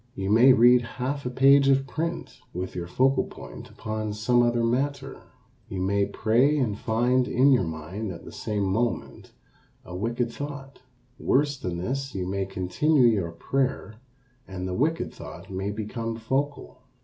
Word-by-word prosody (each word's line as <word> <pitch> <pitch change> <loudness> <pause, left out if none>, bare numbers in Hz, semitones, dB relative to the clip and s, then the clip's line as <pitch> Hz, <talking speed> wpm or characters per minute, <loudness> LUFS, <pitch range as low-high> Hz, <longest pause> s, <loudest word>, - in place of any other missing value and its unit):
You 95 +1 -2
may 120 +5 +7
read 125 0 +6 0.2
half 135 +2 -2
a - - -1
page 135 +2 +5
of 135 0 +3
print 155 -2 -4 0.2
with 90 +1 -4
your 85 -1 -5
focal 130 +9 +2
point - - -11
upon 110 -1 -4
some 120 +4 +2
other 120 -1 +2
matter. 135 +3 -1 0.5
You 95 -3 -4
may 100 +1 +1
pray 120 +8 +2
and 120 -7 0
find 120 +4 +1
in 135 +3 +4
your 125 -8 +3
mind 85 +7 -5
at 85 - -10
the - - -9
same 105 -2 -3
moment 110 +5 -2 0.5
a 90 - -8
wicked 120 +4 -2
thought. 140 -2 -7 0.4
Worse 145 +2 +2
than 90 -9 -4
this, 135 +8 -3
you 95 -2 -2
may 95 0 -2
continue 95 - +2
your 100 -8 +2
prayer 130 +4 -2 0.5
and 95 -1 -5
the 90 - -3
wicked 155 - 0
thought - - -10
may 95 +1 -3
become 110 +2 -4
focal. 135 +6 -3
120 Hz, 160 wpm, -26 LUFS, 100-135 Hz, 0.5 s, may